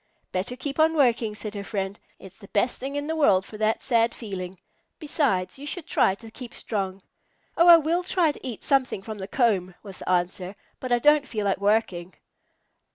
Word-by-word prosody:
"Better 190 +7 -2
keep 280 +3 -5
on 320 +1 +4
working," 235 -6 +2
said 210 -1 -6
her 200 -1 -5
friend. 195 -1 -4 0.2
"It's 190 0 -14
the 200 - -13
best 215 +5 0
thing 275 +2 -5
in 290 0 -2
the 320 +1 -2
world 200 -12 +3
for 215 - -10
that 220 +1 +1
sad 235 -2 +2
feeling. 190 -4 -6 0.4
Besides, 275 - -1
you 290 - -7
should 345 +1 -3
try 190 - +2
to 225 +2 -13
keep 245 0 -10
strong." 195 -3 -3 0.5
"Oh, 340 - +4
I 340 -1 +11
will 330 +3 0
try 355 -3 +2
to - - -14
eat 235 -4 -6
something 260 -8 +1
from 215 0 -7
the 190 - -5
comb," 195 -7 +1
was 195 -3 -10
the - - -6
answer, 180 +2 -1 0.2
"but 255 - -5
I 240 - +5
don't 295 +3 +4
feel 210 -3 -3
like 195 -1 +1
working." 200 -4 0
220 Hz, 205 wpm, -25 LUFS, 195-280 Hz, 0.5 s, I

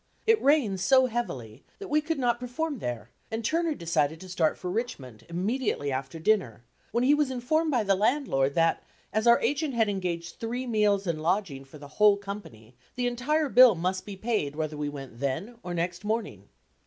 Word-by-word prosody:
It 450 0 +4
rained 265 -9 +3
so 260 +8 +5
heavily 135 - -4
that 400 - -8
we 305 -2 +2
could 320 +1 -2
not 240 -3 +1
perform 265 +3 -3
there 120 - -5 0.2
and 225 0 -4
Turner 330 +1 +1
decided 160 - 0
to 185 - -10
start 165 -3 +1
for 180 - -5
Richmond 140 - -5
immediately 185 - -1
after 130 +3 -4
dinner, 160 - 0 0.3
when 235 - +1
he 275 +3 +5
was 295 -2 +2
informed 285 +6 0
by 250 -6 +2
the 200 -1 +3
landlord 200 - +1
that 165 0 +2 0.3
as 220 +2 +1
our 235 - +7
agent 290 -2 0
had 225 -2 +3
engaged 175 -4 -3
three 240 +3 -3
meals 210 -4 +2
and 165 -3 -2
lodging 165 -5 -1
for 135 +3 -13
the 145 -1 -11
whole 210 +6 +4
company, 195 - -9 0.2
the 250 - -1
entire 275 +6 0
bill 250 -4 +7
must 185 +3 -2
be 205 - -8
paid 195 -9 -2
whether 155 -1 -3
we 150 0 -3
went 135 -5 -9
then, 165 - -3
or 175 -1 -5
next 175 +2 -2
morning. 220 +1 -3
205 Hz, 190 wpm, -27 LUFS, 155-245 Hz, 0.3 s, our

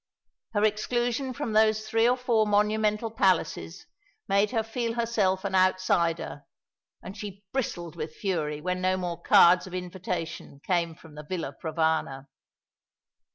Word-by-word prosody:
Her 205 - +2
exclusion 240 +4 0
from 255 -4 -4
those 215 0 +3
three 225 +2 +3
or 250 - +2
four 235 -4 +2
monumental 210 +1 +1
palaces 185 -3 0 0.4
made 200 +1 +3
her 225 -3 0
feel 230 +1 -3
herself 210 -5 0
an 195 - -2
outsider; 185 -5 +1 0.6
and 190 - -8
she 200 -1 -8
bristled 175 -11 -3
with 155 -1 -6
fury 155 -7 -2
when 180 +2 -2
no 185 0 +1
more 175 -2 -4
cards 180 +1 +6
of 185 - -7
invitation 180 -5 -5
came 170 -3 0
from 160 -2 -16
the 150 0 -9
Villa 150 -4 -4
Provana. 160 -4 -1
190 Hz, 140 wpm, -27 LUFS, 170-220 Hz, 0.6 s, cards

